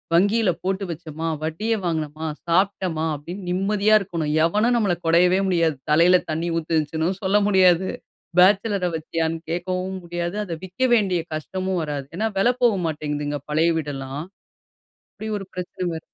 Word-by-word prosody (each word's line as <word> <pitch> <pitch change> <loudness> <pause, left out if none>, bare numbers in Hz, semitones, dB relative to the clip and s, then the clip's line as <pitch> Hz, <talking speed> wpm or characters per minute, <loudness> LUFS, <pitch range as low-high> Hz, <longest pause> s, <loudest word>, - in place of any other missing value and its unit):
வங்கியில 205 +3 +3
போட்டு 190 +1 -1
வச்சோமா. 160 -1 -5 0.2
வட்டியை 210 +9 -1
வாங்கினமா, 155 -1 -2 0.2
சாப்பிட்டமா, 180 -2 +1
அப்படின்னு 175 +7 -8
நிம்மதியா 200 +3 +2
இருக்கணும். 165 -5 -2
எவனும் 215 +8 +2
நம்மள 200 -6 +2
கொடையவே 180 +3 +4
முடியாது. 165 -4 +2
தலையில 170 +4 +6
தண்ணீ 165 +2 -1
ஊத்திரிச்சுன்னு 160 +1 0
சொல்ல 195 +2 +3
முடியாது. 185 -2 +4 0.5
பேச்சலரை 195 0 +4
வச்சியான்னு 165 +1 -2
கேட்கவும் 185 +2 -2
முடியாது. 175 +2 -3
அத 175 - -5
விக்க 185 +8 -4
வேண்டிய 190 -6 +1
கஷ்டமும் 185 +4 -3
வராது 145 -3 -4
ஏன்னா, 220 +3 +1
விலை 240 +6 +4
போக 235 -4 +5
மாட்டேங்குதுங்க, 150 -1 -3
பழைய 160 +3 +3
வீடெல்லாம். 140 -1 -4 0.9
அப்படி 220 - -7
ஒரு 195 - -7
பிரச்சனை 180 0 -5
வருது. 160 - -5
175 Hz, 140 wpm, -23 LUFS, 160-190 Hz, 0.9 s, தலையில